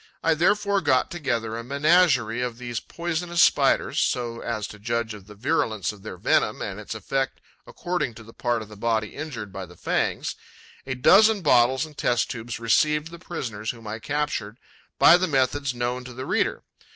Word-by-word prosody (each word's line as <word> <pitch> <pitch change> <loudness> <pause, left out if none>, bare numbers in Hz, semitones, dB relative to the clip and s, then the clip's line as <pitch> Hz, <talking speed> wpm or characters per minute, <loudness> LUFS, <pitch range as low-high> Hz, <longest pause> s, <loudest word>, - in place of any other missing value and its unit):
I 165 - +4
therefore 200 +5 +2
got 130 -6 +2
together 120 -9 -2
a 115 - -5
menagerie 140 -4 +3
of 120 -2 -3
these 120 -2 -4
poisonous 170 0 0
Spiders, - - +3
so 120 -1 -1
as 110 -3 -3
to 105 - -11
judge 115 +1 -2
of 100 -2 -12
the 105 - -12
virulence 110 - 0
of 105 -2 -14
their 100 -3 -8
venom - - +1
and 100 0 -5
its 105 +1 -6
effect 135 +5 -2 0.3
according 175 -10 -3
to 115 - -11
the 115 +1 -14
part 120 -2 -1
of - - -13
the 105 - -12
body 110 0 0
injured 115 -11 -7
by 95 -2 -6
the 90 - -16
fangs. - - -1 0.5
A 130 - -2
dozen 210 - +5
bottles 130 0 +4
and 155 -1 -14
test 120 -2 +1
tubes 115 -1 -6
received 150 +7 +2
the 170 - -10
prisoners, 115 - -5
whom 115 -2 -6
I 110 +1 -5
captured 140 -6 -2 0.4
by 170 - +8
the 185 +1 0
methods 140 -1 +1
known 120 +1 -2
to 125 - -9
the 130 +2 -6
reader. - - 0
120 Hz, 190 wpm, -25 LUFS, 110-150 Hz, 0.5 s, by